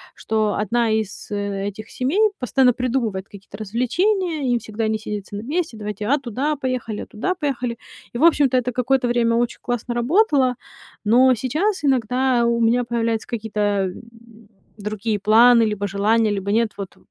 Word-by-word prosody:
что 215 -2 -1
одна 230 +3 0
из 215 -2 -3
этих 205 +1 -4
семей 275 +11 -1 0.2
постоянно 250 0 +3
придумывает 235 -7 -2
какие-то 200 0 -12
развлечения, 285 - 0
им 240 - +2
всегда 220 0 -3
не 220 - 0
сидится 205 -1 -6
на 205 - -4
месте. 305 -2 -2
"Давайте, 210 0 -5
а 285 +5 +3
туда 275 +4 -2
поехали, 255 -5 -3
а - - -6
туда 370 - -2
поехали". 255 -7 -3 0.4
И - - -4
в 305 - 0
общем-то 285 -6 +4
это 250 0 0
какое-то 250 +1 +1
время 235 -1 +2
очень 240 0 -1
классно 245 0 -3
работало. 270 - +2 0.5
Но 250 +4 +5
сейчас 310 - -1
иногда 255 -1 +2
у 235 0 +1
меня 235 +2 +3
появляются 230 -1 -2
какие-то, 220 -3 -5
а, 205 -2 +1
м, 180 - -8 0.8
другие 210 +1 -3
планы, 230 +3 +6
либо 210 -2 -1
желания, 210 +2 +2
либо 200 0 -2
нет, 225 0 +2
вот 195 -2 -7
235 Hz, 165 wpm, -21 LUFS, 210-255 Hz, 0.8 s, планы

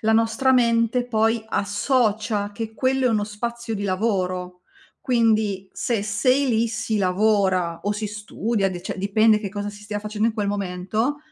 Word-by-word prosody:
la 220 0 +2
nostra 225 +4 +2
mente 235 0 +2
poi 225 -1 +1
associa 210 -1 0
che 220 +1 -6
quello 260 +1 +1
è - - +3
uno 215 -2 +1
spazio 235 +2 -4
di 205 -1 -3
lavoro. 185 -3 -1 0.4
Quindi 220 -6 +1
se 230 -4 -1
sei 255 +6 +2
lì 230 0 +2
si 220 0 -2
lavora 190 -3 +1
o 205 - 0
si 210 +1 -3
studia, 210 0 -2
de 175 -1 -6
cioè - - -5
dipende 215 +3 +3
che 200 - -4
cosa 205 +1 -4
si 205 0 -13
stia 210 0 -4
facendo 215 +1 -1
in 220 - -4
quel 205 -3 -1
momento, 205 +7 -2
215 Hz, 170 wpm, -23 LUFS, 200-230 Hz, 0.4 s, è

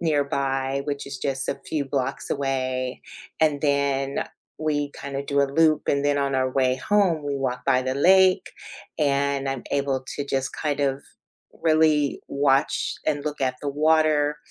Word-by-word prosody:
nearby, 140 -3 0
which 140 -1 -4
is 135 -2 -6
just 135 0 -2
a - - -2
few 150 -3 -1
blocks 135 -1 -2
away, 130 -2 -2 0.4
and 150 -3 +2
then 140 -1 0 0.3
we 145 -2 -1
kinda 140 0 -4
do 140 0 +1
a - - +4
loop 155 +2 +2
and 140 0 +1
then 145 0 +2
on 140 -1 0
our 130 0 +1
way 130 -1 +1
home, 175 -2 +1
we 145 - -2
walk 130 -2 -3
by 130 - +3
the 130 +1 -2
lake 185 +5 +4 0.5
and 140 -1 +1
I'm 135 -2 -4
able 140 -2 0
to 145 - -2
just 135 -1 -2
kind 150 -2 -2
of 135 0 0 0.6
really 155 -3 +3
watch 140 0 +1
and 145 -1 -1
look 150 -1 -4
at 130 -1 0
the 145 - -3
water 150 0 +2
140 Hz, 165 wpm, -24 LUFS, 135-150 Hz, 0.6 s, a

